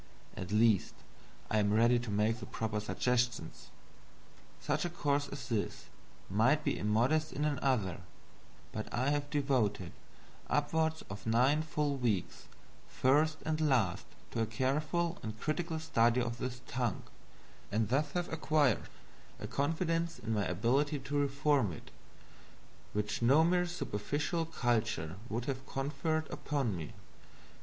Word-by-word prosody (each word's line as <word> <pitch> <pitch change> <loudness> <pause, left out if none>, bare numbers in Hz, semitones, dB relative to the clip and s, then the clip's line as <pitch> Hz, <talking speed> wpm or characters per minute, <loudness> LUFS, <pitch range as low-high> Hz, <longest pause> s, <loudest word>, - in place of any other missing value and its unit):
At 90 0 -6
least 110 -2 +3 0.6
I 110 - +3
am 100 -1 +2
ready 120 +3 +4
to 120 -1 -5
make 105 +3 +1
the - - -7
proper 110 -1 -2
suggestions. 120 -3 -1 0.9
Such - - -1
a 175 - -1
course 145 -4 0
as 140 - -7
this 115 -5 -2 0.4
might 115 +10 +3
be - - +1
immodest 125 +10 +2
in 150 - -1
another; 130 - 0 0.7
but 110 - -5
I 130 +4 +1
have 145 0 -1
devoted 125 - 0 0.6
upward 160 +2 +1
of 95 +2 -8
nine 130 +7 +4
full 150 -2 -1
weeks, 110 -8 -1 0.4
first 155 +4 +2
and 160 0 0
last, 125 - +2 0.2
to 115 - -1
a 115 - +1
careful 150 +9 0
and 110 0 -6
critical 160 +3 -1
study 120 -6 +3
of 120 -1 -2
this 125 0 -4
tongue, 125 -6 -2 0.7
and 110 +1 +1
thus 145 +3 +1
have 175 -2 -2
acquired 155 -6 +2 0.5
a - - -5
confidence 165 +3 0
in 115 -2 -3
my 105 -2 +1
ability 130 - +1
to 135 +1 -5
reform 140 -5 +2
it 75 - -10 1.0
which 105 +2 -1
no 135 +7 +6
mere 180 +1 +3
superficial 155 +1 -2
culture 110 - -1
could 115 +2 -2
have 135 -1 -4
conferred 150 +3 -1
upon 135 -9 -1
me. 80 -3 -6
130 Hz, 135 wpm, -33 LUFS, 110-150 Hz, 1.0 s, no